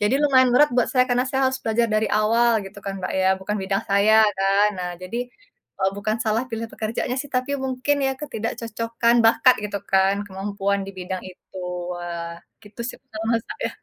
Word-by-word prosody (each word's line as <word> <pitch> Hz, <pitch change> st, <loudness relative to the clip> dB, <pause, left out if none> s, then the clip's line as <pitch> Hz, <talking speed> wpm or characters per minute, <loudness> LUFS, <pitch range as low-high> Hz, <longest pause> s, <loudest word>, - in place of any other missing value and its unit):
jadi 210 Hz, +5 st, +2 dB
lumayan 260 Hz, -3 st, +5 dB
berat 295 Hz, +1 st, +5 dB
buat 245 Hz, -1 st, +2 dB
saya, 255 Hz, -1 st, +3 dB
karena 250 Hz, 0 st, +1 dB
saya 265 Hz, 0 st, +2 dB
harus 260 Hz, -, -4 dB
belajar 230 Hz, +1 st, +1 dB
dari 215 Hz, 0 st, +2 dB
awal, 225 Hz, 0 st, +2 dB
gitu 200 Hz, +1 st, -11 dB
kan, 195 Hz, 0 st, -5 dB
Mbak, 185 Hz, -, -4 dB
ya. 190 Hz, 0 st, +2 dB
Bukan 210 Hz, +2 st, -2 dB
bidang 195 Hz, +2 st, -1 dB
saya, 215 Hz, +2 st, +5 dB
kan. 195 Hz, +2 st, +3 dB
Nah, 180 Hz, 0 st, -3 dB
jadi, 185 Hz, +6 st, -6 dB, 0.6 s
eee, 190 Hz, 0 st, +2 dB
bukan 215 Hz, +2 st, -1 dB
salah 220 Hz, +3 st, +1 dB
pilih 225 Hz, -1 st, -4 dB
pekerjaannya, 230 Hz, +3 st, -3 dB
sih. 285 Hz, -, -7 dB
Tapi 255 Hz, +2 st, -1 dB
mungkin, 265 Hz, +2 st, 0 dB
ya 265 Hz, -, -2 dB
ketidakcocokan 230 Hz, -2 st, -1 dB
bakat, 245 Hz, +2 st, +6 dB
gitu 205 Hz, -1 st, -3 dB
kan, 195 Hz, +1 st, +3 dB
kemampuan 200 Hz, 0 st, -2 dB
di -, -, -6 dB
bidang 185 Hz, 0 st, -4 dB
itu. 185 Hz, +1 st, -16 dB, 0.4 s
Wah, 170 Hz, -1 st, -6 dB, 0.2 s
gitu 205 Hz, +3 st, -12 dB
sih, -, -, -6 dB
pengalaman 225 Hz, -2 st, -2 dB
saya. -, -, -3 dB
215 Hz, 185 wpm, -23 LUFS, 195-245 Hz, 0.6 s, bakat